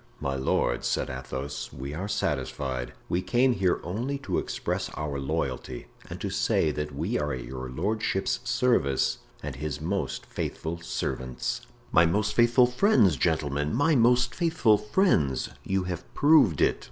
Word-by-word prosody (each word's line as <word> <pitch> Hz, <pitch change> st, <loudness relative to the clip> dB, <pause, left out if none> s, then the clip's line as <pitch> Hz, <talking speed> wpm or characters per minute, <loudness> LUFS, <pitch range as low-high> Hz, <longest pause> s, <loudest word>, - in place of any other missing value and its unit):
"My 70 Hz, -, -2 dB
lord," 65 Hz, -2 st, 0 dB
said -, -, -1 dB
Athos, 65 Hz, -1 st, -5 dB
"we 70 Hz, +1 st, -6 dB
are 95 Hz, +6 st, -4 dB
satisfied; 65 Hz, -10 st, -2 dB
we 90 Hz, -, 0 dB
came 125 Hz, +5 st, +3 dB
here 95 Hz, -4 st, +1 dB
only 120 Hz, +11 st, -2 dB
to -, -, 0 dB
express -, -, -3 dB
our 75 Hz, -2 st, -3 dB
loyalty 65 Hz, -2 st, -3 dB, 0.2 s
and -, -, -6 dB
to -, -, -2 dB
say 75 Hz, -, +2 dB
that 75 Hz, -1 st, -4 dB
we 70 Hz, -, -1 dB
are 75 Hz, 0 st, -1 dB
at 65 Hz, -1 st, -4 dB
your 65 Hz, 0 st, -6 dB
lordship's 95 Hz, -, -1 dB
service 115 Hz, -, +1 dB, 0.2 s
and 70 Hz, -3 st, -5 dB
his 75 Hz, -1 st, -4 dB
most 95 Hz, +6 st, -2 dB
faithful 85 Hz, +2 st, -4 dB
servants." 65 Hz, -6 st, -3 dB, 0.2 s
"My 85 Hz, +1 st, +6 dB
most 105 Hz, +4 st, 0 dB
faithful 120 Hz, +1 st, +5 dB
friends, 125 Hz, -, +4 dB
gentlemen, 75 Hz, -, 0 dB
my 145 Hz, +5 st, +3 dB
most 125 Hz, 0 st, +4 dB
faithful 140 Hz, -11 st, +3 dB
friends; 105 Hz, -, +1 dB
you 95 Hz, -1 st, 0 dB
have 90 Hz, -2 st, -6 dB
proved 145 Hz, -, +5 dB
it. -, -, +3 dB
85 Hz, 155 wpm, -27 LUFS, 70-115 Hz, 0.2 s, My